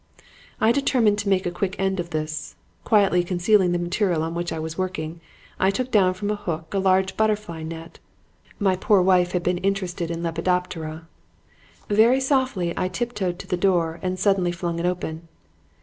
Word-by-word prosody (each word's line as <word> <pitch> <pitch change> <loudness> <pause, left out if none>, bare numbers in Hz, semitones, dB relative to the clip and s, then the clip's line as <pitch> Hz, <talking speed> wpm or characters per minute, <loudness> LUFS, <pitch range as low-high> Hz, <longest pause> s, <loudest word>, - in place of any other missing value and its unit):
"I 220 - +4
determined 235 -6 +2
to 205 -1 -2
make 190 -1 +2
an 175 0 -3 0.2
end 190 -1 0
of 170 -1 -3
this. 155 -2 -4 0.3
Quietly 195 -5 +3
concealing 180 +1 +2
the 175 - +1
material 175 -1 0
on 165 +1 -3
which 175 0 -3
I 160 - -3
was 160 0 -4
working, 170 -3 -4 0.4
I 190 - +4
took 255 +6 -2
down 185 -3 +4
from 205 +2 -2
a - - 0
hook 165 -5 -5
a 195 - +1
large 190 0 +2
butterfly 210 -6 -1
net 165 +1 -8 0.6
(my 195 -3 +2
poor 200 +2 +3
wife 180 -1 +3
had 180 -1 0
been 180 0 0
interested 185 -3 -2
in 170 0 -4
Lepidoptera). 165 -1 -2 0.8
Very 225 +5 +4
softly 260 - 0
I 185 - 0
tiptoed 190 -3 -3
to - - -9
the 180 - -1
door 175 -3 +1
and 185 0 -2
suddenly 190 -2 +2
flung 170 -1 -3
it 175 - 0
open. 165 -2 -4
180 Hz, 180 wpm, -23 LUFS, 170-200 Hz, 0.8 s, I